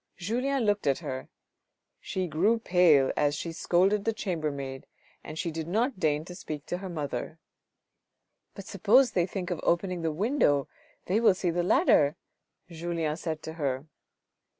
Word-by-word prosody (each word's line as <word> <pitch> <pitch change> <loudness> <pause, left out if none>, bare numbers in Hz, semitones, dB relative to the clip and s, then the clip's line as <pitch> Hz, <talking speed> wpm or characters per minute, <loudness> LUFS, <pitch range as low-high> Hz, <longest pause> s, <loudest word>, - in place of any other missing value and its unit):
Julien 250 +8 -1
looked 205 -6 +1
at 135 - +3
her, 130 0 -6 0.7
she 185 -1 -3
grew 180 +8 +2
pale 175 -10 +4
as 145 0 +1
she 165 +2 -4
scolded 185 +5 +2
the 225 - 0
chamber 175 -8 -2
maid, 135 -2 -6 0.4
and 155 - -8
she 170 - -2
did 160 0 -5
not 225 +5 0
deign 155 -3 +1
to 180 - -9
speak 155 -4 -7
to 175 - -3
her 190 -1 -6
mother. 160 0 -4 0.6
" - - -55
But 195 - -9
suppose 220 +8 +4
they 175 -1 +1
think 185 -1 -4
of 175 - -2
opening 180 0 0
the 165 -1 0
window, 155 - +1 0.4
they 195 +5 +1
will 225 -5 +5
see 180 -2 -1
the 175 +1 0
ladder," 175 - +4 0.5
Julien 165 -2 -3
said 160 -1 -5
to 160 - -6
her. 135 0 -1
175 Hz, 170 wpm, -28 LUFS, 155-200 Hz, 0.7 s, will